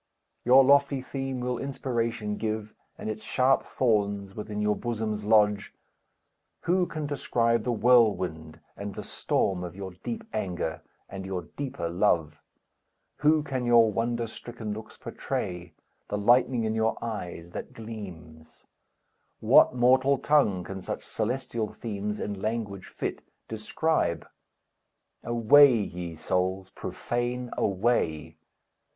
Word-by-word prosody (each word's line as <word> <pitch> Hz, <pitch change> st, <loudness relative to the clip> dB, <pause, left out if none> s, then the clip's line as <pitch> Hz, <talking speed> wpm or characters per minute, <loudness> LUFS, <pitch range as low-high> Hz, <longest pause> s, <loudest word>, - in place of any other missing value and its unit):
Your 130 Hz, +2 st, +7 dB
lofty 140 Hz, 0 st, +4 dB
theme 135 Hz, 0 st, -4 dB
will 125 Hz, -1 st, -2 dB
inspiration 115 Hz, -5 st, -2 dB
give, 110 Hz, -1 st, -3 dB, 0.2 s
And -, -, -6 dB
its 110 Hz, 0 st, -4 dB
sharp 130 Hz, +4 st, +3 dB
thorns 100 Hz, -5 st, 0 dB
within 105 Hz, -1 st, -5 dB
your 105 Hz, 0 st, +2 dB
bosoms 110 Hz, -3 st, -3 dB
lodge. 105 Hz, -2 st, +3 dB, 0.9 s
Who 180 Hz, +1 st, +2 dB
can 155 Hz, -3 st, -4 dB
describe 115 Hz, -5 st, +1 dB
the 125 Hz, -, -1 dB
whirlwind 95 Hz, -10 st, +2 dB
and 100 Hz, 0 st, -6 dB
the -, -, -5 dB
storm 90 Hz, -2 st, -1 dB
Of 90 Hz, 0 st, -7 dB
your 95 Hz, -1 st, -6 dB
deep 230 Hz, -1 st, -4 dB
anger, 85 Hz, -3 st, -3 dB, 0.3 s
and 95 Hz, 0 st, -7 dB
your 95 Hz, -2 st, -4 dB
deeper 135 Hz, -11 st, -3 dB
love? 85 Hz, -4 st, +1 dB, 0.8 s
Who 155 Hz, 0 st, +3 dB
can 130 Hz, -4 st, -3 dB
your 120 Hz, -2 st, +5 dB
wonder 115 Hz, +2 st, -1 dB
stricken 115 Hz, -1 st, -7 dB
looks 110 Hz, +1 st, -9 dB
portray, 90 Hz, -2 st, -4 dB, 0.3 s
The 105 Hz, -, -2 dB
lightning 120 Hz, +3 st, +3 dB
in 110 Hz, 0 st, 0 dB
your 110 Hz, 0 st, +1 dB
eyes 90 Hz, -7 st, -6 dB
that -, -, -6 dB
gleams? 90 Hz, -9 st, -10 dB, 0.7 s
What -, -, +6 dB
mortal 130 Hz, +3 st, +4 dB
tongue 125 Hz, -12 st, +2 dB
can 95 Hz, +1 st, -7 dB
such -, -, -5 dB
celestial 115 Hz, -1 st, -2 dB
themes 105 Hz, -2 st, -4 dB
In 100 Hz, -2 st, -4 dB
language 105 Hz, -4 st, -3 dB
fit -, -, -4 dB, 0.3 s
describe? 110 Hz, -, -1 dB, 1.0 s
Away 120 Hz, +4 st, +6 dB
ye 90 Hz, -5 st, -4 dB
souls, 95 Hz, +3 st, -1 dB
profane, 120 Hz, +1 st, -3 dB
away! 80 Hz, -7 st, 0 dB
110 Hz, 125 wpm, -27 LUFS, 95-125 Hz, 1.0 s, Your